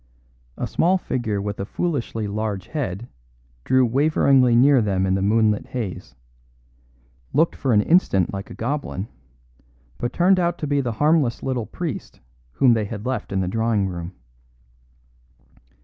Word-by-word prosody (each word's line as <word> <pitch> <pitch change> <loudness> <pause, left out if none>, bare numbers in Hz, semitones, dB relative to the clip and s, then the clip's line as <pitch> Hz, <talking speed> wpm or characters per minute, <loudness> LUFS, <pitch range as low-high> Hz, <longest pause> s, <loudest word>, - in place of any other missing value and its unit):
A - - -2
small 185 +3 +2
figure 115 - -2
with 100 0 -4
a 100 - -2
foolishly 120 - -3
large 100 -2 -3
head 120 - -4 0.6
drew 130 - +3
waveringly 135 -1 +3
near 130 +1 +5
them 95 -3 0
in 95 - +1
the 95 - 0
moonlit 105 +1 +2
haze; 110 -8 -6 1.2
looked 160 +4 +2
for 135 - -1
an 105 -2 +5
instant 100 - +2
like 100 0 -6
a - - -9
goblin, 120 -5 -3 0.9
but 120 - -2
turned 185 +2 +3
out 175 -1 0
to - - -4
be 145 -1 +1
the 120 -3 -3
harmless 145 -1 +1
little 125 -5 -2
priest 155 - -6 0.3
whom 125 - +4
they 110 -2 0
had 105 +1 -7
left 130 -4 -3
in 95 -1 0
the 90 - -1
drawing 110 0 0
room. 85 0 -6
115 Hz, 150 wpm, -22 LUFS, 100-140 Hz, 1.2 s, near